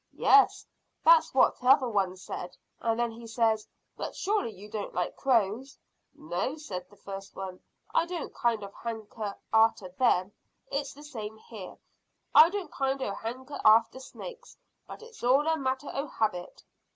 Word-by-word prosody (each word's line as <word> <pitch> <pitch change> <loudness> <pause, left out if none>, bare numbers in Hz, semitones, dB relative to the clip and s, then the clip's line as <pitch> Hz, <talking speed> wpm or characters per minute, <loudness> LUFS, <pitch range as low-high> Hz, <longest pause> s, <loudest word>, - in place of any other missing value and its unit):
"Yes, 415 0 +5 0.4
that's - - +7
what - - +4
t'other 255 +1 +5
one 195 -5 0
said; 180 -1 -7 0.2
and 225 0 0
then 240 -1 +1
he 230 +1 -10
says, 220 -1 +1 0.3
`But - - -4
surely 410 - 0
you 205 0 -12
don't 210 -1 -5
like 180 - -1
crows?' 245 +1 +1 0.4
`No,' 175 - -3
says 195 -12 -5
the - - -18
first 195 0 -9
one, 190 -1 -6 0.3
`I 335 - +3
don't 345 -3 -5
kind 230 -3 0
o' 200 - -7
hanker 220 -2 -6 0.2
arter 220 -4 +4
them.' 185 -2 +2 0.4
It's 280 -1 -3
the 295 - -12
same 220 -7 -7
here, 215 -4 -10 0.6
I 325 - +9
don't 380 -5 -4
kind 270 0 -1
o' 200 - -2
hanker 255 +7 -6
arter 225 +4 +5
snake; - - -9 0.4
but - - -10
it's 460 - -14
all 265 +4 +4
a 320 0 +2
matter 265 -1 -2
o' 280 +2 -2
habit." 210 -8 -2
230 Hz, 165 wpm, -29 LUFS, 205-275 Hz, 0.6 s, I